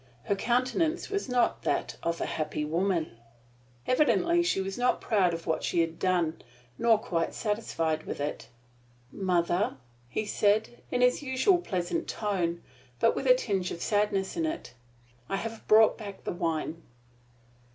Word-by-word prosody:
Her 200 - 0
countenance 255 - 0
was 400 -8 -2
not 245 -1 +2
that - - -1
of 170 0 -1
a - - -1
happy 155 -1 -2
woman. 165 -5 -1 0.7
Evidently 335 +6 +3
she 345 - +1
was 195 0 -3
not 245 0 +1
proud 195 -6 +2
of 165 0 -5
what 160 - -1
she 170 - +2
had 165 0 -2
done, 175 -3 +1 0.4
nor 230 -1 +5
quite 170 -5 -2
satisfied 165 -8 -1
with - - -4
it. 145 +1 -4 0.6
"Mother," 180 0 0 0.3
he 215 - -2
said, 210 +3 +1
in 250 - 0
his 250 +2 +4
usual 280 +7 +3
pleasant 200 - -2
tone, 180 -5 -1 0.4
but 230 - +3
with - - -2
a - - +8
tinge 195 - -1
of - - -6
sadness 205 -2 0
in 330 -1 0
it, 320 - -5 0.6
"I - - 0
have 225 +3 -5
brought 220 +2 +6
back 200 -3 -8
the - - -3
wine." 165 -1 -2
200 Hz, 155 wpm, -29 LUFS, 170-245 Hz, 0.7 s, a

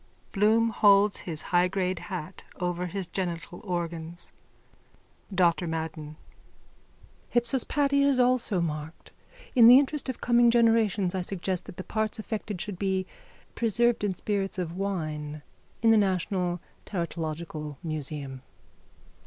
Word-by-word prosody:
_ - - -33
(Bloom 220 +3 +3
holds 205 -1 +5
his 155 -2 -2
high 175 +1 +5
grade 185 -1 -1
hat 185 -2 -7 0.2
over 180 0 -1
his 190 +2 -3
genital 175 0 -4
organs.) 170 -3 -4 1.0
DR 180 -3 +4
MADDEN: 160 -2 -5 1.2
Hypsospadia 280 +3 +2
is 270 -2 +3
also 245 -6 +2
marked. 155 0 -5 0.4
In 235 -3 +8
the 245 +2 +10
interest 285 0 0
of 260 - -4
coming 240 0 +4
generations 225 -5 +3
I 190 - -1
suggest 185 0 -3
that 175 - -11
the 185 - -5
parts 215 +1 -2
affected 215 -3 -4
should 195 -1 -5
be 190 -1 0 0.5
preserved 235 0 +1
in 195 -3 0
spirits 195 0 -2
of 175 -2 -3
wine 155 -6 -3 0.4
in 225 - +6
the 225 - +6
national 185 -3 0 0.3
teratological 160 -4 -4
museum. 145 -4 -5
185 Hz, 130 wpm, -27 LUFS, 170-220 Hz, 1.2 s, the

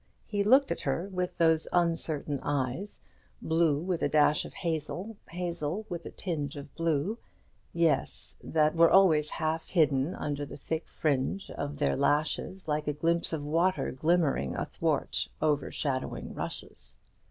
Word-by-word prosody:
He 205 -1 0
looked 265 +6 +5
at - - -2
her 165 +8 -1
with 180 -1 -2
those 160 -1 +3
uncertain 165 -4 0
eyes, 145 +8 -2 0.4
blue 160 -2 +2
with 175 +1 -2
a - - +2
dash 150 -1 +4
of - - -10
hazel, 170 +5 -3
hazel 175 +2 -3
with 175 -1 -5
a - - -5
tinge 155 -5 -4
of 140 -1 -9
blue, 165 +7 0 0.6
eyes 165 -4 0
that 155 -1 +2
were 165 0 +6
always 160 -6 +5
half 160 0 -2
hidden 150 -3 +2
under 145 -1 -3
the 140 0 -7
thick 160 +3 -4
fringe 150 +6 -1
of 145 0 -4
their 145 - +1
lashes, 155 +6 0
like 150 0 -1
a 150 - +1
glimpse 165 +3 0
of 160 -3 -2
water 170 +5 +1
glimmering 145 - +1
athwart - - -1
overshadowing 145 -3 -1
rushes. - - -7
160 Hz, 145 wpm, -29 LUFS, 145-175 Hz, 0.6 s, were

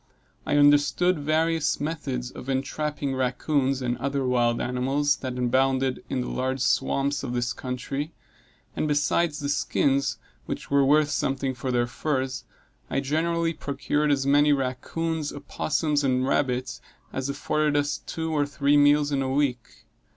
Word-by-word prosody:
I 145 - +2
understood 145 +4 +4
various 155 +1 +1
methods 140 -5 -3
of 130 - -9
entrapping 140 +1 -2
rackoons, 130 +1 0
and 120 0 -1
other 140 +1 -1
wild 120 -2 +2
animals 135 +4 0
that 130 -2 -5
abounded 130 +1 +1
in 130 - -1
the - - -4
large 130 +1 -2
swamps 140 +2 +1
of 120 - -4
this 120 0 -1
country; 135 +4 -4 0.6
and - - -1
besides 150 +2 +1
the 145 - -3
skins, 140 -1 +1 0.3
which - - -5
were 140 0 +4
worth 145 +2 +4
something 135 -1 -1
for 130 +1 -4
their 120 -1 +2
furs, 130 0 -2 0.4
I 135 - 0
generally 165 +4 0
procured 145 0 -1
as 135 -1 +1
many 145 +1 +4
rackoons, 145 +4 -2
opossums, 145 +1 -1
and 130 -1 +1
rabbits, 125 -3 -1 0.3
as 130 +1 -3
afforded 150 +1 0
us 145 0 0
two 160 -1 -4
or 145 -2 +1
three 140 +1 +2
meals 145 0 +4
in 140 -1 +1
a 130 - -1
week. 125 -6 -2
140 Hz, 150 wpm, -26 LUFS, 130-145 Hz, 0.6 s, understood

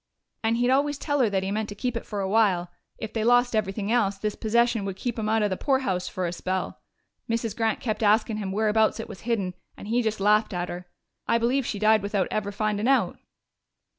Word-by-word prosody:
And 225 +1 +2
he'd 245 +1 +2
always 285 +2 +2
tell 290 0 -1
her 240 -4 +4
that 190 -2 0
he 190 - -2
meant 215 +1 -2
to 205 - -7
keep 250 +3 -2
it 230 - -5
for 205 -2 -3
a 190 - -1
while; 190 -4 +2 0.3
if 220 -1 -6
they 220 - -1
lost 245 0 +4
everything 205 0 -1
else, 205 -5 +2
this 210 +1 -2
possession 235 0 +1
would 195 -1 -4
keep 235 +3 -4
'em 215 -1 -1
out 220 0 +2
of 205 - +1
the 185 - -1
poorhouse 250 -10 0
for 185 - -3
a 170 - -2
spell. 185 +1 -3 0.5
Mrs. 230 -2 -1
Grant 225 -2 0
kept 225 -4 -3
askin' 215 +1 +3
him 200 -3 -3
whereabouts 215 +2 +2
it - - -5
was - - -10
hidden, 195 -6 0 0.2
and 205 - -9
he 240 +2 +2
just 220 -2 -1
laughed 210 0 +3
at 175 0 -2
her. 175 0 -7 0.4
I 230 - +3
believe 245 +3 +1
she 210 - -3
died 215 +1 +4
without 200 -2 0
ever 205 -1 -1
findin' 210 +1 -1
out.... 270 0 +2
215 Hz, 230 wpm, -26 LUFS, 200-230 Hz, 0.5 s, her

